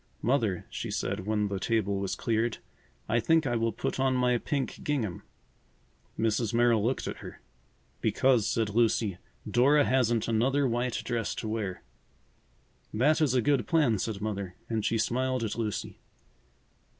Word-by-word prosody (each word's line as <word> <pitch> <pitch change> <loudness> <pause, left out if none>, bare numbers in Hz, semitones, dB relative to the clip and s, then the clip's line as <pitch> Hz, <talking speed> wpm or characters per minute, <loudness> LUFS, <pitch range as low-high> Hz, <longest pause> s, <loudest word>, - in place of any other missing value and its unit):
"Mother," 115 -7 +1
she - - -4
said 95 - -3
when 105 -1 +1
the 100 -1 -3
table 100 -2 0
was 95 -1 -2
cleared, 115 0 0 0.5
"I 115 +2 +2
think 160 +6 +3
I 120 -2 0
will 115 0 +1
put 110 - -3
on 130 -1 +2
my 125 -1 +2
pink 140 0 -3
gingham." 115 - -2 1.0
Mrs. 115 0 0
Merrill 120 -3 +4
looked 125 +4 0
at - - -4
her. - - -10 0.6
"Because," 125 -5 +3
said 115 -2 0
Lucy, 110 -4 +1 0.3
"Dora 140 +4 +4
hasn't 120 -3 +2
another 130 +5 +2
white 120 0 -1
dress 115 -3 -2
to 110 - -5
wear." 110 -4 -3 1.1
"That 145 +9 +2
is 140 -5 +2
a 125 - +3
good 140 +2 +2
plan," 145 - +3
said 105 0 -3
Mother, 100 -4 -4
and 110 -2 -1
she 115 - +1
smiled 130 +3 0
at 110 - -2
Lucy. 110 -3 -4
115 Hz, 155 wpm, -29 LUFS, 110-130 Hz, 1.1 s, Merrill